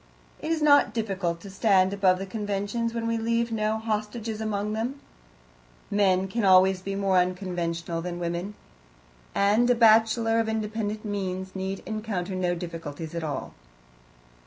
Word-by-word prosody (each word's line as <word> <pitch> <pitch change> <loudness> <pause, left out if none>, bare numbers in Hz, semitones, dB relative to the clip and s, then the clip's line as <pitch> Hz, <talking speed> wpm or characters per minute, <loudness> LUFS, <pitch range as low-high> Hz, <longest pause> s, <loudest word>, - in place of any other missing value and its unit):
It 310 - -5
is 320 -2 0
not 285 -4 +5
difficult 190 -6 -2
to 200 - -9
stand 190 -1 +3
above 190 -2 +3
the 195 - -5
conventions 205 +3 -2
when 230 0 -3
we 230 0 0
leave 230 +1 0
no 215 0 0
hostages 220 0 -3
among 210 -1 -2
them; 240 +6 -3 0.9
men 190 -2 +3
can 230 +4 -2
always 190 0 +5
be 195 +1 -4
more 195 -2 +2
unconventional 175 -2 -2
than 175 0 -4
women, 175 +4 -3 0.8
and 210 +5 +3
a 245 - +5
bachelor 225 0 +4
of 225 -1 0
independent 215 -1 -3
means 190 -2 -4
need 190 0 -4
encounter 210 -4 -3
no 180 -1 0
difficulties 165 -2 -6
at 170 -1 -3
all. 145 -4 -4
200 Hz, 150 wpm, -26 LUFS, 185-220 Hz, 0.9 s, not